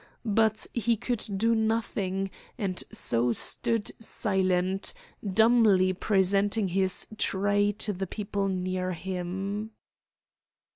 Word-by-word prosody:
But 220 0 +2
he 235 -1 +1
could 240 0 -2
do 230 +3 +2
nothing, 215 -4 -1 0.3
and 195 -6 -1
so 120 +1 +3
stood 225 - 0
silent, 190 - 0 0.3
dumbly 210 -2 +4
presenting 200 +2 +1
his 190 +1 +1
tray 205 +1 +1
to 210 0 -2
the 190 +1 -4
people 200 0 -3
near 185 -1 -2
him. 190 +4 -4
200 Hz, 100 wpm, -28 LUFS, 185-220 Hz, 0.3 s, dumbly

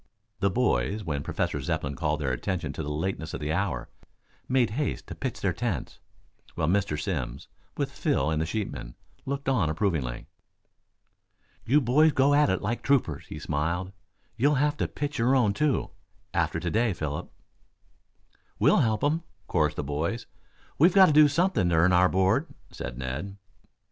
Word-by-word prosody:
The 100 +1 +2
boys, 100 - 0
when 75 -6 -2
Professor - - -2
Zepplin 70 -1 -2
called 75 -1 -1
their 70 -3 0
attention 90 +7 -3
to - - -5
the 75 - -4
lateness 80 +2 -3
of - - -5
the 75 +1 -2
hour, 100 +3 -1 0.6
made 130 -4 +2
haste 145 +6 -2
to - - -7
pitch 130 -4 -5
their 95 -3 +1
tents, 105 - -3 0.6
while 80 - 0
Mr. 95 -4 +1
Simms, 65 -7 -4 0.3
with - - -1
Phil 80 - 0
and 80 0 0
the 80 - -1
sheepmen, 70 - -4 0.3
looked 140 0 -3
on 110 - +2
approvingly. 80 - -1 1.4
"You 145 +6 +4
boys 145 +5 +4
go 140 +2 +4
at 145 0 +4
it 95 - 0
like 115 +4 -2
troopers," 125 - +1
he - - -7
smiled. 85 +5 -2 0.5
"You'll 145 +5 +3
have 145 +2 +2
to - - 0
pitch 145 -2 -4
your 125 +4 +3
own, 115 -6 +3
too, 150 +3 0 0.4
after 85 -1 0
to 85 0 -3
day, 115 -1 +2
Philip." 75 -4 -4 1.3
"We'll - - +4
help 110 -2 +1
him," 155 +3 +2 0.3
chorused 75 -3 +1
the - - -2
boys. 80 - -2 0.5
"We've 170 +5 +5
got 190 -1 +9
to 155 - +3
do 150 0 +8
something 145 - +1
to 85 - +2
earn 85 +3 +4
our 90 +1 +5
board," 95 +1 +2 0.2
said - - -6
Ned. 70 +10 -5
95 Hz, 170 wpm, -27 LUFS, 75-130 Hz, 1.4 s, got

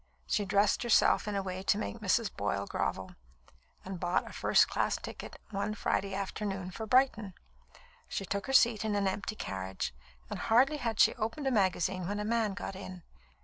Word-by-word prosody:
She 210 - 0
dressed 200 +1 +2
herself 235 -2 +4
in 210 - -2
a 195 - -1
way 185 0 -4
to 195 - +2
make 220 +1 -4
Mrs. 215 +1 +1
Boyle 100 0 -1
grovel, - - -3 0.7
and 190 -1 -6
bought 175 - 0
a - - -10
first - - +4
class - - 0
ticket, - - -8 0.2
one 200 +1 -2
Friday 195 -1 -1
afternoon, 195 -1 -3
for 220 +4 -6
Brighton. 225 -6 +2 0.7
She 195 - -3
took 200 +4 -3
her - - -2
seat 230 -4 +5
in 215 -1 0
an 200 -1 +1
empty 200 +3 -3
carriage, 95 - -4 0.3
and - - -5
hardly 260 +7 +3
had 230 -6 -3
she - - +6
opened 230 +6 -3
a 270 - +2
magazine 185 -4 +1
when 205 +1 -2
a 210 - -2
man 220 -3 0
got 195 - -5
in. 185 -2 -8
200 Hz, 190 wpm, -31 LUFS, 190-220 Hz, 0.7 s, she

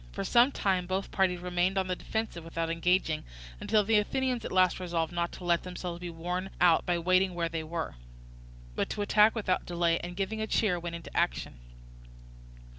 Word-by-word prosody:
For - - -3
some 245 +3 +4
time 185 -7 0
both 190 +1 -2
parties 180 -2 +1
remained 180 +2 0
on 190 - +2
the 185 0 -2
defensive 220 -4 -4
without 165 0 -3
engaging, 165 -2 +1 0.4
until 215 -1 +2
the 215 +1 +4
Athenians 250 +2 -1
at - - -5
last 185 -1 +3
resolved 170 -2 -2
not 170 0 -1
to - - -10
let 170 -1 +2
themselves 180 -1 -6
be 175 0 -6
worn 180 +3 -4
out 175 -2 +4
by 175 -1 +2
waiting 185 +2 +2
where 170 -1 -1
they 160 -1 -3
were, 165 - -4 0.8
but - - -1
to 205 - -2
attack 210 +2 +4
without 200 -5 -1
delay, 170 -1 +1
and 175 0 -7
giving 215 +3 -2
a 220 - -2
cheer, 200 -5 +1
went 170 0 -5
into 170 - -10
action. - - -1
180 Hz, 190 wpm, -29 LUFS, 170-195 Hz, 0.8 s, some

